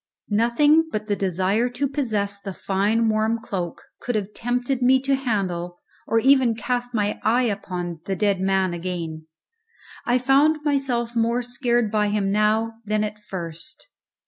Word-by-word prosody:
Nothing 265 Hz, +9 st, +4 dB
but 215 Hz, -3 st, -3 dB
the 205 Hz, -1 st, 0 dB
desire 195 Hz, +5 st, +1 dB
to 250 Hz, +3 st, -1 dB
possess 215 Hz, -8 st, -1 dB
the 195 Hz, -1 st, -6 dB
fine 210 Hz, +4 st, +1 dB
warm 220 Hz, +1 st, +1 dB
cloak 180 Hz, -6 st, -5 dB, 0.2 s
could 245 Hz, -, -3 dB
have 210 Hz, -1 st, -2 dB
tempted 245 Hz, +2 st, -1 dB
me 260 Hz, +1 st, +5 dB
to 275 Hz, 0 st, +1 dB
handle 190 Hz, -9 st, -2 dB, 0.3 s
or 225 Hz, -, +1 dB
even 260 Hz, -1 st, +4 dB
to -, -, -10 dB
cast 245 Hz, -1 st, -2 dB
my 210 Hz, -1 st, 0 dB
eye 235 Hz, +4 st, +2 dB
upon 180 Hz, -6 st, -3 dB
the 195 Hz, -, -1 dB
dead 200 Hz, -1 st, +1 dB
man 190 Hz, -1 st, +1 dB
again. 165 Hz, -3 st, -5 dB, 0.8 s
I 245 Hz, +1 st, +2 dB
found 285 Hz, +4 st, +3 dB
myself 250 Hz, -5 st, 0 dB
more 235 Hz, +2 st, +1 dB
scared 240 Hz, -2 st, 0 dB
by 210 Hz, -1 st, +2 dB
him 205 Hz, -1 st, 0 dB
now 220 Hz, +2 st, +1 dB
than 215 Hz, 0 st, 0 dB
at 210 Hz, 0 st, -5 dB
first. 175 Hz, -, -6 dB
220 Hz, 160 wpm, -23 LUFS, 195-245 Hz, 0.8 s, me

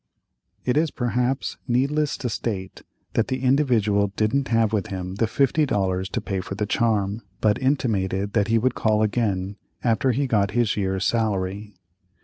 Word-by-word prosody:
It 125 Hz, +2 st, +1 dB
is, 160 Hz, +1 st, +3 dB
perhaps, 125 Hz, +1 st, -1 dB
needless 140 Hz, +4 st, +1 dB
to 125 Hz, -, -3 dB
state 100 Hz, -4 st, -4 dB, 0.3 s
that 115 Hz, -, +1 dB
the 130 Hz, 0 st, -3 dB
Individual 120 Hz, -7 st, +3 dB
didn't 130 Hz, +7 st, +1 dB
have 115 Hz, -2 st, +2 dB
with 105 Hz, -3 st, 0 dB
him 95 Hz, 0 st, -5 dB
the 115 Hz, -, +2 dB
fifty 140 Hz, +6 st, +2 dB
dollars 95 Hz, -7 st, 0 dB
to -, -, -2 dB
pay 95 Hz, -2 st, -3 dB
for 95 Hz, -, -6 dB
the 105 Hz, +1 st, -1 dB
charm, 105 Hz, -1 st, 0 dB, 0.2 s
but 105 Hz, -1 st, +2 dB
intimated 105 Hz, -8 st, 0 dB
that 105 Hz, -3 st, +2 dB
he 115 Hz, +1 st, +3 dB
would 125 Hz, +2 st, +1 dB
call 110 Hz, -2 st, +2 dB
again, 100 Hz, -3 st, -1 dB, 0.3 s
after 120 Hz, +2 st, +2 dB
he 140 Hz, +4 st, 0 dB
got 105 Hz, -6 st, +2 dB
his 120 Hz, -3 st, +2 dB
year's 95 Hz, -1 st, -1 dB
salary. 105 Hz, -2 st, -1 dB
110 Hz, 165 wpm, -24 LUFS, 100-125 Hz, 0.3 s, is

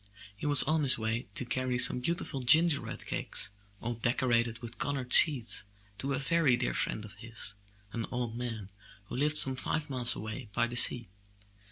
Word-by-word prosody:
He 125 Hz, -, -6 dB
was 145 Hz, -2 st, +6 dB
on 155 Hz, 0 st, 0 dB
his 135 Hz, -3 st, +6 dB
way 110 Hz, +1 st, -4 dB
to 125 Hz, -, -1 dB
carry 130 Hz, 0 st, -2 dB
some 125 Hz, -, +4 dB
beautiful 140 Hz, -1 st, -2 dB
gingerbread 160 Hz, +4 st, +2 dB
cakes, -, -, 0 dB, 0.3 s
all 120 Hz, +1 st, -4 dB
de 115 Hz, +1 st, -1 dB
corated 115 Hz, -3 st, 0 dB
with 120 Hz, -1 st, -11 dB
colored 135 Hz, -3 st, -3 dB
seeds, 125 Hz, -12 st, +6 dB, 0.4 s
to 140 Hz, +4 st, -3 dB
a -, -, -2 dB
very 140 Hz, -2 st, +1 dB
dear 125 Hz, -, -3 dB
friend 110 Hz, -, -4 dB
of 105 Hz, -, -13 dB
his, 110 Hz, -3 st, -6 dB, 0.4 s
an 115 Hz, -1 st, -4 dB
old 120 Hz, -2 st, -4 dB
man 115 Hz, -5 st, -6 dB, 0.4 s
who -, -, -9 dB
lived 150 Hz, +4 st, 0 dB
some 135 Hz, -1 st, +4 dB
five 150 Hz, +3 st, -3 dB
miles 125 Hz, -2 st, +2 dB
away 110 Hz, +2 st, -8 dB
by 120 Hz, -, +1 dB
the 120 Hz, +1 st, -7 dB
sea. 120 Hz, -1 st, +3 dB
125 Hz, 185 wpm, -29 LUFS, 115-140 Hz, 0.4 s, was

